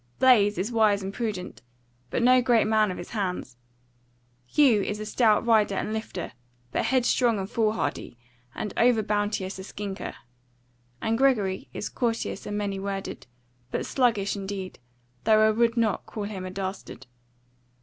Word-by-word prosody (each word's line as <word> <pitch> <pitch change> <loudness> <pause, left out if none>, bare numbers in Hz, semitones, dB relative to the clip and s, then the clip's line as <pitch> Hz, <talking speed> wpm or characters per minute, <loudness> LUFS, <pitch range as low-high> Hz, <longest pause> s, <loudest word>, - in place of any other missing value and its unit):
Blaise 210 -6 +5
is 195 +7 -2
wise 215 -3 +3
and 195 +1 -5
prudent, 210 -6 -4 0.5
but - - -1
no 255 +1 +6
great 240 -3 +3
man 215 -1 +3
of 185 - -4
his 175 - -8
hands. 180 - -3 0.9
Hugh 250 - +4
is 205 +2 -3
a 215 - -5
stout 215 0 +3
rider 215 -4 +3
and 215 - -2
lifter, 220 -5 -5 0.4
but - - 0
headstrong 245 -2 +2
and 190 -1 -3
foolhardy, 215 - -1 0.4
and 210 -3 -4
over 235 -2 +4
bounteous 205 -2 -1
a - - -6
skinker; 200 0 -6 0.9
and 225 +1 0
Gregory 210 -9 +1
is - - -4
courteous 230 -4 -2
and 205 - -3
many 200 -2 -2
worded, 195 -6 -5 0.4
but - - -2
sluggish 230 -7 +1
in 195 -1 -6
deed; 190 -2 -6 0.5
though 215 0 +5
I - - +4
will 230 +2 +3
not 225 -4 0
call 215 - -5
him 200 -3 -5
a - - -5
dastard. 190 -7 -6
210 Hz, 160 wpm, -26 LUFS, 195-230 Hz, 0.9 s, no